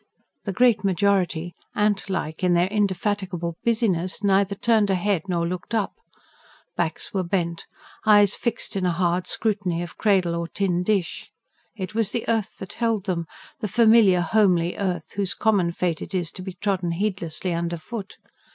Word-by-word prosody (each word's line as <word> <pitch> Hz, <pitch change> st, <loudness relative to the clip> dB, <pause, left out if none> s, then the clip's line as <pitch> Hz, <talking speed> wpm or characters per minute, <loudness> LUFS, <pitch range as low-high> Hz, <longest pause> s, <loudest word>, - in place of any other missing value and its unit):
The 200 Hz, -, -1 dB
great 240 Hz, +3 st, +3 dB
majority, 185 Hz, -3 st, +1 dB, 0.2 s
ant 205 Hz, -1 st, +1 dB
like 160 Hz, -3 st, -3 dB
in 180 Hz, -1 st, +4 dB
their 175 Hz, +1 st, +4 dB
indefatigable 190 Hz, -3 st, -1 dB
busyness, 210 Hz, -5 st, 0 dB
neither 200 Hz, 0 st, +3 dB
turned 220 Hz, -1 st, +2 dB
a 190 Hz, -, +3 dB
head 190 Hz, -1 st, -1 dB
nor 170 Hz, -1 st, 0 dB
looked 180 Hz, +6 st, -4 dB
up: 215 Hz, -3 st, 0 dB, 0.8 s
backs -, -, -2 dB
were 195 Hz, -, +1 dB
bent, 170 Hz, -2 st, -2 dB, 0.4 s
eyes 205 Hz, -2 st, +5 dB
fixed, 235 Hz, -3 st, -2 dB
in 195 Hz, -, -1 dB
a 180 Hz, -, +2 dB
hard 175 Hz, +1 st, 0 dB
scrutiny 195 Hz, -6 st, -1 dB
of 175 Hz, -, -10 dB
cradle 190 Hz, -5 st, +3 dB
or 170 Hz, 0 st, -2 dB
tin 180 Hz, 0 st, 0 dB
dish: 190 Hz, -2 st, -1 dB, 0.5 s
it 190 Hz, -1 st, -5 dB
was 220 Hz, -2 st, +1 dB
the 235 Hz, -, -3 dB
earth 225 Hz, -3 st, -1 dB
that 190 Hz, -, -8 dB
held 225 Hz, -4 st, 0 dB
them, 170 Hz, -4 st, -2 dB, 0.3 s
the 215 Hz, -, -2 dB
familiar, 220 Hz, -4 st, +5 dB
homely 175 Hz, -2 st, +2 dB
earth, 180 Hz, -5 st, -3 dB
whose 200 Hz, -2 st, -1 dB
common 200 Hz, -6 st, +2 dB
fate 170 Hz, -2 st, -1 dB
it -, -, -6 dB
is 175 Hz, -3 st, -1 dB
to -, -, -9 dB
be 185 Hz, 0 st, -6 dB
trodden 180 Hz, -2 st, -1 dB
heedlessly 180 Hz, -2 st, -2 dB
underfoot. 170 Hz, +5 st, -4 dB
190 Hz, 165 wpm, -24 LUFS, 175-210 Hz, 0.8 s, eyes